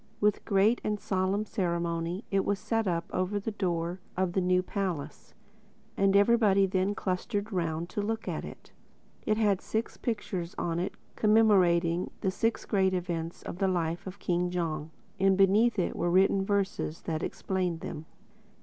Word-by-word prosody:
With 210 -1 +2
great 205 +4 +3
and 210 -1 -1
solemn 190 +2 0
ceremony 170 -1 -2
it 195 -1 +2
was 200 - 0
set 225 +1 -1
up 170 -1 0
over 185 +3 0
the 210 +3 -3
door 175 -3 -2 0.2
of 185 -2 0
the 190 - +1
new 180 0 +2
palace: 185 -7 -4 0.6
and 195 0 +3
everybody 200 -2 +5
then 190 +2 0
clustered 200 +3 -2
round 165 -2 -1
to 205 - -2
look 225 +2 -3
at - - -3
it. - - -10 0.6
It 215 - +2
had 205 -4 +2
six 220 +1 -3
pictures 190 -7 -3
on 170 0 -1
it 180 - -3 0.2
commemorating 185 -6 +4
the 190 - +1
six 225 +4 -1
great 190 -3 +2
events 170 -2 -4
in - - -6
the 195 0 +1
life 170 -1 -1
of 190 +1 -7
King 180 -2 0
Jong 160 -3 -2 0.3
and 190 0 +4
beneath 210 +5 +4 0.2
were 175 - -1
written 190 +2 +4
the 195 - -1
verses 195 -5 -1
that 160 -1 -3
explained 180 -3 -2
them. 155 +1 -6
190 Hz, 165 wpm, -29 LUFS, 175-205 Hz, 0.6 s, everybody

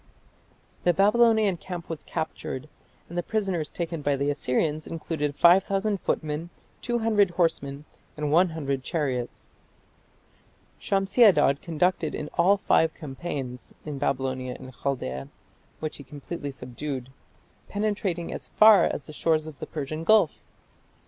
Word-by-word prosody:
The 175 -1 +3
Babylonian 215 0 +4
camp 175 0 -7
was 165 -3 -5
captured, 155 -4 -5 0.4
and 170 - -10
the 175 - +1
prisoners 190 -6 -1
taken 165 -2 -4
by 145 -1 +1
the 140 +1 0
Assyrians 150 +2 -1
included 155 -3 -3
5000 195 +4 +4
footmen, 155 +2 -2 0.3
200 225 -4 +2
horsemen, 150 -5 -1 0.3
and 150 -1 -1
100 160 -5 +2
chariots. 130 -6 -3 1.3
Shamshi 195 +5 +2
Adad 150 -9 +5
conducted 165 -1 0
in 150 - -5
all 190 +4 +4
five 160 -4 +2
campaigns 135 -4 -6
in 145 -3 -5
Babylonia 130 -2 -1
and 130 - -10
Chaldaea, 70 - -3 0.5
which 155 -1 -4
he 140 - -10
completely 145 +2 -6
subdued, 130 0 -6 0.6
penetrating 200 -5 -2
as - - -7
far 215 -1 +7
as 140 - -3
the 155 - -10
shores 155 0 +1
of 155 -3 -10
the - - -6
Persian 155 +1 -4
Gulf. 215 -3 +4
160 Hz, 130 wpm, -26 LUFS, 140-185 Hz, 1.3 s, far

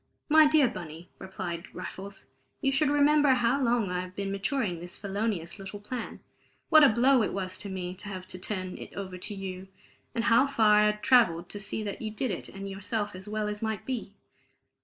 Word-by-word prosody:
"My 310 0 +7
dear 295 -3 +5
Bunny," 175 -6 -8
replied 180 -2 -5
Raffles, 195 +1 -8 0.3
"you 270 - +1
should 285 +2 +2
remember 290 -1 +4
how 245 +3 +2
long 235 -6 +1
I 180 - -1
had 185 0 -7
been 200 -1 -3
maturing 195 - -1
felonious 200 -1 -3
little 195 +1 -7
plan, 240 +4 -6 0.5
what 310 -1 +8
a 285 - +8
blow 250 +3 +4
it 215 - -1
was 185 -1 -3
to 200 - -5
me 180 -1 -4
to 190 +3 -8
have 185 -2 -6
to 185 - -4
turn 185 -1 -3
it - - -9
over 185 -2 -6
to 205 - -4
you, 190 -1 -6 0.5
and 230 - 0
how 235 +4 +5
far 215 -6 +4
I 210 - +5
had 210 0 0
travelled 180 -10 +4
to 205 - -5
see 210 +1 -3
that 205 -1 -5
you 220 - -3
did 220 +3 -2
it 180 - -5
and 195 0 -7
yourself 205 +2 -3
as 190 +3 -8
well 215 0 -1
as 210 0 -4
might 220 -2 -3
be. 235 -6 -4
205 Hz, 205 wpm, -28 LUFS, 185-240 Hz, 0.5 s, what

